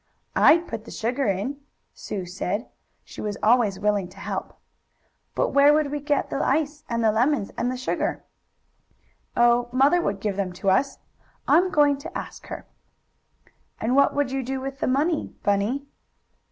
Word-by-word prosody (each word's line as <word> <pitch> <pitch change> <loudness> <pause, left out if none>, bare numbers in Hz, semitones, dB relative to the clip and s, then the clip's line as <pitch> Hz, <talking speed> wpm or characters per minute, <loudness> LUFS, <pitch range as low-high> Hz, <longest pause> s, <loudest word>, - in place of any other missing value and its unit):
"I'd 340 +1 +5
put 225 -1 -6
the - - -10
sugar 245 +3 -1
in," 200 +9 -1 0.4
Sue 190 -3 -5
said. 190 +5 -3 0.4
She - - -10
was 210 -1 -3
always 220 -3 +3
willing 205 -3 +1
to 185 - -18
help. - - -5 0.8
"But - - +1
where 285 +1 +5
would 300 -2 +1
we 295 - -2
get 290 0 -1
the - - -1
ice 295 +1 0
and 230 -1 -1
the 220 - +4
lemons 245 0 +1
and 245 +1 -1
the 255 - -4
sugar?" 255 - -2 1.1
"Oh, 240 0 +4
mother 275 +7 +4
would 200 -10 -2
give 200 -1 -2
them 190 -3 -2
to 190 +2 0
us. 270 +9 +1 0.5
I'm 365 +2 +4
going 290 -4 +3
to 285 - -6
ask - - -8
her." - - -7 1.1
"And 235 +4 0
what 280 - +4
would 285 -2 0
we 270 - 0
do 265 +1 -3
with 270 +1 -6
the - - -1
money, 295 +5 0
Bunny?" 205 +8 0
255 Hz, 170 wpm, -24 LUFS, 210-285 Hz, 1.1 s, I'd